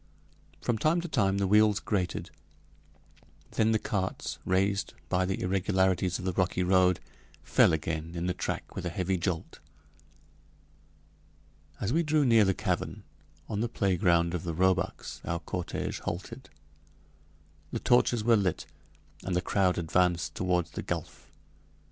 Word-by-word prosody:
From 115 -2 -1
time 155 +8 +3
to 175 - -5
time 100 - +1
the 100 - +1
wheels 105 +1 +4
grated. 90 -5 -2 1.2
Then 110 0 +2
the 110 - +3
carts, 95 -3 -3
raised 95 +2 0
by 90 0 +1
the 95 - -2
irregularities 95 -1 +1
of 95 - -7
the 95 - 0
rocky 90 +1 +1
road, 90 -1 +4 0.4
fell - - +4
again 80 +1 -3
in 85 +1 -2
the 90 - 0
track - - -4
with - - -4
a 90 - -2
heavy 95 +2 -1
jolt. 85 -1 -3 2.2
As 105 +5 -1
we 165 - +3
drew 155 -2 +2
near 115 -4 +5
the 95 -1 +1
cavern, - - -2 0.4
on 105 -2 -3
the 120 - -1
playground 85 -5 +2
of 90 - -2
the 85 -2 -4
roebucks, 95 +2 0
our 85 0 -2
cortége 90 +1 -4
halted. 95 +9 -6 1.2
The - - -2
torches 120 -2 +3
were 115 +1 +5
lit, 95 -5 0 0.6
and 95 - -2
the - - +3
crowd 95 -3 +2
advanced 85 -1 +1
toward 90 -2 0
the - - -5
gulf. - - -6
95 Hz, 145 wpm, -29 LUFS, 90-105 Hz, 2.2 s, near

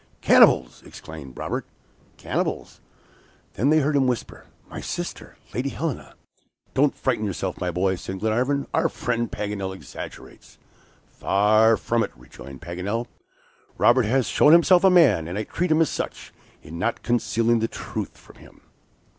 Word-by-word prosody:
"Cannibals!" - - +5
exclaimed 75 -5 -11
Robert, - - -3 0.5
"cannibals?" - - -3 0.7
Then 125 +8 +1
they 155 0 +4
heard 145 +1 0
him 135 -2 +3
whisper, 125 -3 -4 0.2
"My - - -8
sister! - - -6 0.2
Lady 130 +3 -2
Helena." 155 -1 -5 0.6
"Don't 140 +1 +2
frighten 125 -5 -1
yourself, 95 -2 -4
my 90 - -1
boy," 90 +2 0
said 95 +2 -6
Glenarvan; 125 +7 0
"our - - +2
friend 120 -2 -2
Paganel 100 -2 -4
exaggerates." - - -11 0.5
"Far 110 +3 +3
from 115 +3 0
it," 105 - -1
rejoined 65 +2 -13
Paganel. 95 +7 -3 0.7
"Robert 120 +2 +4
has 130 +2 +2
shown 150 - +4
himself 175 +2 +6
a 190 - +7
man, 140 - +4
and 90 +3 -5
I 105 - -1
treat 180 +10 -2
him 155 +1 +3
as 160 - +3
such, - - -5 0.3
in 85 +2 -9
not - - -2
concealing 115 -1 +1
the 115 - 0
truth - - -6
from - - -18
him." - - -18
115 Hz, 150 wpm, -24 LUFS, 95-135 Hz, 0.7 s, a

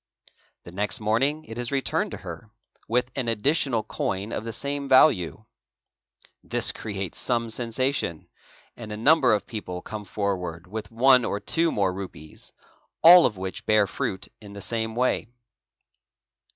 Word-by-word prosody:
The 85 - -11
next 95 -1 -1
morning 135 +9 0
it 115 +2 -8
is 120 +1 -3
returned 135 -1 0
to - - -7
her - - -8 0.4
with 125 +3 0
an 130 -3 -2
additional 120 +1 +1
coin 100 +3 -3
of - - -3
the 115 - -4
same 140 +3 -4
value. 110 - +4 1.0
This - - +3
creates 100 -4 -5
some 115 -2 -1
sensation; 120 - -2 0.5
'and 110 -3 -9
a 105 - -5
number 140 +2 +4
of 105 -2 +1
people 90 -5 -6
come 105 -1 -7
forward 90 -4 -3
with 105 +4 -7
one 125 +2 +5
or 100 - -2
two 165 +8 +1
or - - -4
more 95 -3 +1
rupees, 90 -5 -9 0.5
all 175 +1 +9
of 105 - -7
which 95 0 -6
bear 110 -1 +4
fruit 95 -1 -4
in 100 -1 -11
the 100 - -8
same 110 0 -3
way. 125 -2 0
110 Hz, 155 wpm, -25 LUFS, 100-130 Hz, 1.0 s, all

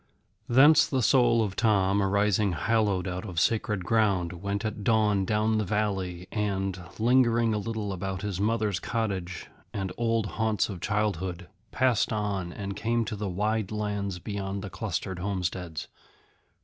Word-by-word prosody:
Thence 145 +6 +7
the 130 -3 0
soul 120 -2 +4
of 100 -2 -3
Tom, 100 -3 +2
arising 100 0 +2
hallowed 100 0 +1
out 90 0 -4
of 90 -6 -3
sacred 105 -1 0
ground, 100 -6 +2
went 100 +4 -3
at 105 -1 -4
dawn 105 -3 +2
down 110 +2 +1
the - - +1
valley, 95 -3 -2
and, 95 -3 -2 0.2
lingering 115 -1 +3
a 105 - 0
little 105 -2 -3
about 95 +1 -4
his 100 -2 -3
mother's 105 -3 +1
cottage 95 -7 -3 0.2
and 95 -2 -3
old 115 -2 +1
haunts 110 0 0
of 95 -4 -6
childhood, 95 -4 -2 0.2
passed 130 -4 +2
on 100 -5 -2
and 100 +1 -5
came 115 +2 0
to 110 - -4
the 105 -1 -3
wide 105 +2 -1
lands 105 -3 -2
beyond 100 0 -4
the 95 - -6
clustered 95 -3 -3
homesteads. 90 -4 -3
105 Hz, 150 wpm, -27 LUFS, 95-110 Hz, 0.2 s, Thence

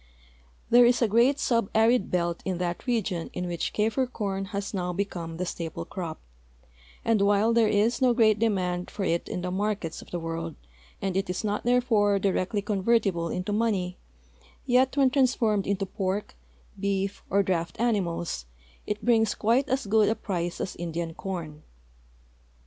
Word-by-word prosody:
There 245 +1 +8
is 245 0 +3
a - - +4
great 235 +6 +4
subarid 230 -2 +2
belt 170 -1 -1
in 185 -2 -2
that 175 +5 -3
region 205 -8 -1
in 180 - -3
which 175 -2 -2
Kafir 225 +5 +1
corn 195 -5 -3
has 200 +1 -4
now 180 -2 -1
become 170 -4 -4
the 180 - -2
staple 165 -2 -5
crop, 170 -4 -6 0.9
and 225 -3 +3
while 205 +3 +3
there 230 -1 +4
is 215 +4 +2
no 255 -1 +5
great 220 -3 +4
demand 180 -5 0
for 200 - -4
it 170 -2 -1
in 180 - -4
the 180 - -2
markets 195 -4 -2
of - - -14
the 175 - -3
world, 165 -1 -4 0.5
and 190 -2 -1
it 195 -1 -1
is 180 - -2
not, 210 0 -2
therefore, 230 -5 +3
directly 195 +1 0
convertible 195 -4 +1
into 180 +4 -2
money, 200 -5 0 0.7
yet, 255 +2 +3
when 270 -2 +4
transformed 240 -7 +2
into 195 0 -1
])ork, 195 +2 -1 0.5
beef, 200 0 -1
or 200 +1 +3
draft 170 -3 -2
animals, 175 - -1 0.4
it 210 +1 -3
brings 225 -3 +3
quite 235 +5 +2
as 265 0 0
good 215 +1 +3
a 220 - +1
price 175 -5 -3
as 190 - -4
Indian 170 -1 -4
corn. 165 -5 -6
200 Hz, 165 wpm, -27 LUFS, 180-225 Hz, 0.9 s, There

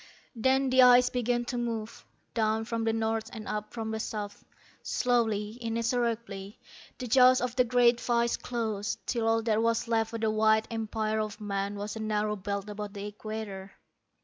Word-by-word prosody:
_ - - -7
_Then 265 +1 +3
the 260 0 +6
ice 250 0 +7
began 240 -1 0
to 245 0 -3
move, 230 -2 -4 0.3
down 220 -1 +1
from 230 0 -2
the 225 - +2
north 225 0 -1
and 220 -3 -7
up 210 0 -4
from 225 -2 -4
the 220 - -3
south. 210 -2 -5 0.4
Slowly, 225 -3 0
inexorably, 230 -3 -2 0.4
the 255 - -5
jaws 255 +1 +6
of 250 -1 -2
the 250 - +4
great 240 0 +4
vise 235 -1 +1
closed, 220 -4 -3
till 230 -2 -1
all 225 0 +2
that 220 -1 +2
was 230 0 +1
left 225 -1 +1
of 225 - -4
the 220 -1 +2
wide 220 0 +3
empire 220 -1 -1
of 215 0 -3
man 200 -1 -2
was 205 +1 -5
a - - -5
narrow 215 -1 0
belt 200 0 -4
about 210 -1 -6
the 200 -1 -6
equator. 210 -2 -6
225 Hz, 180 wpm, -29 LUFS, 210-235 Hz, 0.4 s, ice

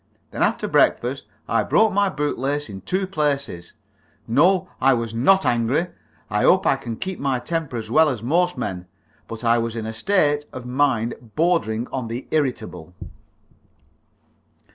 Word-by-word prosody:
Then - - -5
after - - +1
breakfast - - +1 0.2
I - - +2
broke 220 -2 +3
my 200 0 +2
boot 150 -7 -2
lace 145 +1 -2
in 95 -1 -8
two 190 - -1
places. 140 - -2 0.5
No, 180 +10 +3
I 135 0 +5
was 115 -1 -3
not 190 +12 +3
angry. 120 +9 +1 0.4
I - - -1
hope - - +4
I - - +4
can 115 -1 -6
keep 190 +8 -4
my 135 -2 0
temper 160 -1 -3
as 110 -1 -6
well 160 +4 +5
as 120 -5 -4
most 175 +7 +1
men. 90 -3 -4 0.4
But 115 +1 -8
I 115 0 +3
was 115 0 -3
in 115 -1 -4
a 110 - -4
state 145 - +1
of 125 -1 -8
mind 125 -4 -1
bordering 135 -10 +1
on 130 -3 -4
the 115 +3 -6
irritable. 115 - -2
130 Hz, 165 wpm, -22 LUFS, 115-160 Hz, 0.5 s, I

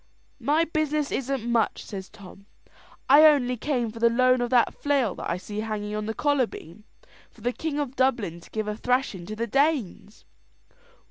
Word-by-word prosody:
"My 295 +6 +2
business 305 -2 -1
isn't 265 -3 -2
much," 235 -2 0
says 190 -2 -7
Tom. 200 -1 -14 0.6
"I 285 +3 +7
only 275 -5 +5
came 245 -2 -2
for 230 - -10
the 235 0 +4
loan 255 +1 +3
of 240 - -1
that 245 -2 +3
flail 275 -9 0
that - - -6
I 170 - -1
see 205 +3 -7
hanging 215 -1 -4
on 215 0 -3
the 220 - -3
collar 285 -4 +2
beam, 190 +5 -12 0.4
for - - -21
the 245 +1 -1
king 310 +1 -4
of 280 -3 -3
Dublin 235 -11 0
to - - -16
give 215 -1 -3
a 210 - -2
thrashing 245 -7 -1
to 215 - -5
the 230 +2 -2
Danes." 260 - -1
240 Hz, 190 wpm, -25 LUFS, 215-275 Hz, 0.6 s, I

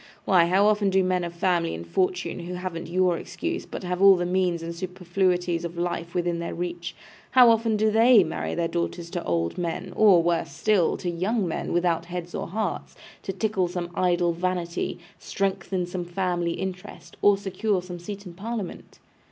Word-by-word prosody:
Why, 180 -3 +5
how 190 +3 +4
often 210 -1 +3
do 190 0 +3
men 185 -1 +1
of 170 - -4
family 170 -1 0
and 85 +1 -7
fortune, 180 - -1
who 175 +1 -6
haven't 180 -2 -5
your 180 -1 +2
excuse, 340 +1 -4
but - - -7
have 180 0 -2
all 195 -1 +9
the 175 -1 -1
means 180 -2 0
and 165 0 -4
superfluities 180 -1 -1
of 170 0 -6
life 170 -1 -3
within 175 -1 0
their 170 - -4
reach, 175 0 -4 0.3
how 250 -2 +7
often 225 -1 +2
do 215 +1 +2
they 225 -1 +6
marry 160 - -3
their 170 -1 0
daughters 170 0 -3
to 175 -2 -3
old 85 - -1
men, 180 +2 -3
or 195 -6 +6
(worse 170 -4 0
still) 175 +3 +2
to 180 - -3
young 190 +4 0
men 160 - -3
without 170 -1 +1
heads 175 0 -6
or - - -3
hearts, 205 +1 -3 0.3
to - - -4
tickle 195 -1 0
some 175 -1 -4
idle 175 -1 +2
vanity, 175 0 -2 0.2
strengthen 190 -2 -2
some 175 0 -5
family 175 -1 -1
interest, 185 0 -7
or 205 -1 +5
secure 195 +1 -1
some 180 -1 -7
seat 200 +3 -7
in 180 - -9
Parliament! 205 0 -6
180 Hz, 185 wpm, -25 LUFS, 170-195 Hz, 0.3 s, all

